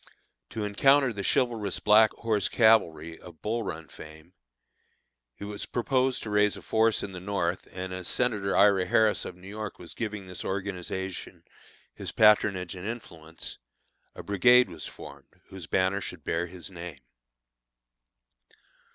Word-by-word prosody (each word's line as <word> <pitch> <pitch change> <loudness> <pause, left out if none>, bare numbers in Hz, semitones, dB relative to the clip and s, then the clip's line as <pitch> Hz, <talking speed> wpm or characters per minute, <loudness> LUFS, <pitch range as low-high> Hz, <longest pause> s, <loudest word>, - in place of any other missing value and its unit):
To 110 - -4
encounter 135 +5 +3
the 100 - -5
chivalrous 110 -3 0
Black 110 +1 +6
Horse 110 -4 -1
Cavalry, 85 -8 +3
of 85 -3 -14
Bull 115 +2 -1
Run 80 -6 -6
fame, 80 +5 -13 1.0
it 100 - -7
was 105 0 -6
proposed 130 +1 0
to 110 - -6
raise 105 0 +2
a - - -12
force 110 0 +2
in 100 - -5
the 90 - -7
North, 90 -2 -2
and 95 0 -6
as 90 -1 -4
Senator 105 -6 +1
Ira 100 -2 +5
Harris, 110 +1 +2
of 90 - -7
New 90 +1 -14
York, 105 +1 -6
was 85 - -9
giving 105 -3 -5
this 90 -1 -7
organization 95 -1 -5 0.5
his - - -6
patronage 100 -4 +3
and 90 +2 -7
influence, 85 -9 -8 0.6
a - - -8
brigade 125 +5 +5
was 80 -3 -7
formed, - - -13
whose 95 -3 -9
banners 95 +2 +1
should 85 -5 -6
bear 85 +4 -1
his 90 +1 -10
name. 85 -4 -8
100 Hz, 150 wpm, -28 LUFS, 90-110 Hz, 1.0 s, Black